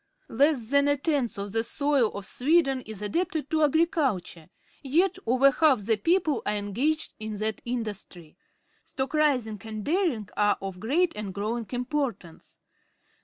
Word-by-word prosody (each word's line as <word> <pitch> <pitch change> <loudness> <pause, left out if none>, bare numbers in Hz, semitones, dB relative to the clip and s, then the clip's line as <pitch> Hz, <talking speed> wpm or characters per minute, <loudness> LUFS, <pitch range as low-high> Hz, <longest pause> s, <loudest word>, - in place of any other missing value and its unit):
Less 265 -2 +2
than 280 0 +4
a 285 0 +2
tenth 280 -6 -1
of 200 0 -4
the 225 +2 +1
soil 280 -2 +1
of 200 -1 -6
Sweden 270 - +2
is 210 -2 -6
adapted 315 - -2
to 315 -1 +2
agriculture, 285 - 0 0.3
yet 330 +8 +1
over 260 +3 +5
half 275 -4 +3
the 220 +3 +1
people 315 - +1
are 210 - -1
engaged 240 +10 -1
in 215 -1 -5
that 215 0 -2
industry. 210 -9 -5 0.5
Stock 265 +2 -4
raising 255 -9 +1
and 215 -2 -6
dairying 310 - 0
are 205 -1 +2
of 195 -2 -6
great 325 - +1
and 200 -3 -5
growing 220 +2 -3
importance. 245 - -4
250 Hz, 150 wpm, -27 LUFS, 210-295 Hz, 0.5 s, over